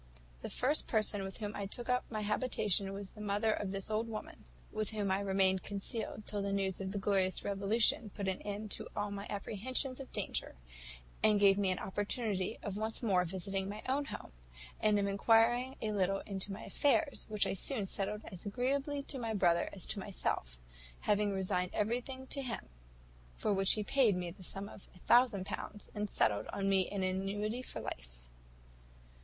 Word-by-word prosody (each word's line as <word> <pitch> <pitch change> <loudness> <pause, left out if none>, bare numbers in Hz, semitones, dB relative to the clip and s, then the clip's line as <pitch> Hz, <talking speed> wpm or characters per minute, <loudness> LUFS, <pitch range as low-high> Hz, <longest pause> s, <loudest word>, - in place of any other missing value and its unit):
The - - -5
first 285 +5 +1
person 215 -2 +2
with 195 0 -5
whom 210 -1 -4
I 200 -1 -3
took 240 +4 -5
up 250 0 +2
my 215 -2 -3
habitation 210 -3 +1
was 195 0 -6
the 210 - -11
mother 210 +1 +2
of 205 - -2
this 195 +2 -2
old 220 +2 +1
woman, 215 -1 -7 0.3
with 215 -1 -1
whom 205 -3 -1
I 190 - +2
remained 190 -1 +2
concealed 210 +1 -2
till 205 -1 0
the 200 0 -1
news 195 -1 0
of 190 0 -3
the 205 - -3
glorious 195 -2 +2
revolution 210 +2 +3
put 200 -2 -3
an 190 -1 -1
end 210 0 -5
to - - -3
all 205 0 -1
my 200 0 -5
apprehensions 255 +6 -1
of 270 - -8
danger, - - -1 0.7
and 210 -1 +5
gave 200 0 +6
me 195 -2 +2
an 185 - +1
opportunity 205 0 -1
of 200 -1 -3
once 220 +3 -2
more 185 -5 +3
visiting 190 +2 -2
my 210 +1 -6
own 280 +2 +1
home, - - -7 0.5
and 215 -1 +4
of 200 - +2
enquiring 230 +6 +4
a 215 - 0
little 195 -1 +1
into 195 0 -4
my 195 - -6
affairs, 290 +1 +1
which 210 -1 +2
I - - 0
soon 210 +2 0
settled 205 +2 -1
as 180 - -8
agreeably 275 +6 -1
to 275 -1 -5
my 225 -2 -2
brother 170 -3 +3
as 190 - -4
to 205 - -2
myself; - - -2 0.4
having 205 0 +2
resigned 185 -2 0
everything 245 +5 -1
to 275 +1 -3
him, 245 - -5 0.7
for 210 - 0
which 195 0 +4
he 215 - -1
paid 230 -2 +4
me 175 -1 -3
the 185 - -14
sum 195 +2 -3
of 200 - -12
a - - -14
thousand 235 -2 +4
pounds, 210 +1 -6
and 210 0 -2
settled 105 - +2
on 195 -1 -2
me 190 -2 +3
an 200 -2 -2
annuity 200 +5 -1
for - - -5
life. - - -7
205 Hz, 195 wpm, -34 LUFS, 195-220 Hz, 0.7 s, gave